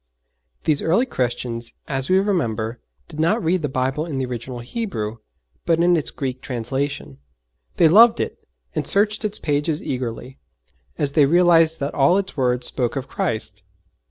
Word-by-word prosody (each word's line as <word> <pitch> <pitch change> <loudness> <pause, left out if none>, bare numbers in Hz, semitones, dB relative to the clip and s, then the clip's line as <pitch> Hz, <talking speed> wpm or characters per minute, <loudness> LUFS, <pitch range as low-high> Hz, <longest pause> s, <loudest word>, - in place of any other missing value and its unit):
These 150 -2 +1
early 185 +10 +2
Christians, 120 - -2
as 135 -1 -2
we 185 - +5
remember, 120 - -1 0.3
did 155 - -10
not 180 +8 +2
read 175 +2 +1
the 145 - -2
Bible 130 +3 -1
in 145 -5 -4
the 130 - -1
original 125 0 -6
Hebrew, 120 - -4 0.5
but 165 - +2
in 175 +1 +4
its 160 - -1
Greek 130 -2 -4
translation. 120 - -3 0.6
They 165 - +6
loved 225 +8 +7
it - - -4 0.3
and - - -2
searched 210 +2 +2
its 210 -1 -1
pages 150 +1 -1
eagerly, 125 0 -5 0.6
as 140 - 0
they 145 -1 +4
realized 165 -1 +4
that 140 - -2
all 140 +7 +4
its 200 -2 -3
words 125 -2 0
spoke 125 -1 -1
of 135 -1 -4
Christ! 110 - -2
140 Hz, 160 wpm, -22 LUFS, 125-170 Hz, 0.6 s, loved